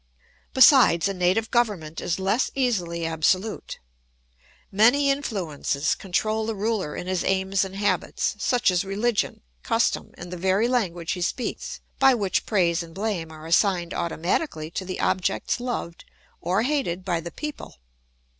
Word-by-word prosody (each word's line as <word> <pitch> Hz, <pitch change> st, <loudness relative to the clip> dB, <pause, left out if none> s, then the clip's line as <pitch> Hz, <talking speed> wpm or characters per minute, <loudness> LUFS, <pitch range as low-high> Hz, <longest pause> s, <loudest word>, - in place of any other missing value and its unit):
Besides, 255 Hz, -, +6 dB
a 195 Hz, -, -2 dB
native 185 Hz, +5 st, +1 dB
government 200 Hz, -10 st, 0 dB
is 170 Hz, -, -1 dB
less 195 Hz, +6 st, +1 dB
easily 180 Hz, -11 st, 0 dB
absolute. 175 Hz, +6 st, 0 dB, 0.9 s
Many 245 Hz, +8 st, +4 dB
influences 175 Hz, -, -1 dB
control 215 Hz, +4 st, -1 dB
the 225 Hz, -, -2 dB
ruler 205 Hz, -6 st, -2 dB
in -, -, -5 dB
his 185 Hz, -1 st, -1 dB
aims 190 Hz, 0 st, +1 dB
and 190 Hz, 0 st, -6 dB
habits, 200 Hz, +1 st, 0 dB
such 245 Hz, -2 st, +2 dB
as 180 Hz, 0 st, +1 dB
religion, 205 Hz, +3 st, -1 dB, 0.2 s
custom, -, -, 0 dB
and 175 Hz, 0 st, -9 dB
the -, -, -5 dB
very 190 Hz, +5 st, +2 dB
language 180 Hz, -9 st, -1 dB
he 180 Hz, -, -3 dB
speaks, 375 Hz, -, -3 dB, 0.2 s
by 270 Hz, -1 st, +6 dB
which 200 Hz, -5 st, -1 dB
praise 175 Hz, -5 st, +2 dB
and 165 Hz, -1 st, -10 dB
blame 195 Hz, -6 st, -3 dB
are 155 Hz, 0 st, -11 dB
assigned 175 Hz, 0 st, +2 dB
automatically 170 Hz, -, -2 dB
to 185 Hz, -, -4 dB
the 185 Hz, -, -5 dB
objects 185 Hz, +4 st, 0 dB
loved 240 Hz, -9 st, -4 dB, 0.4 s
or 185 Hz, +5 st, +1 dB
hated 245 Hz, -, -1 dB
by 175 Hz, -3 st, 0 dB
the 170 Hz, +1 st, -6 dB
people. 300 Hz, -, -7 dB
190 Hz, 145 wpm, -25 LUFS, 170-225 Hz, 0.9 s, Besides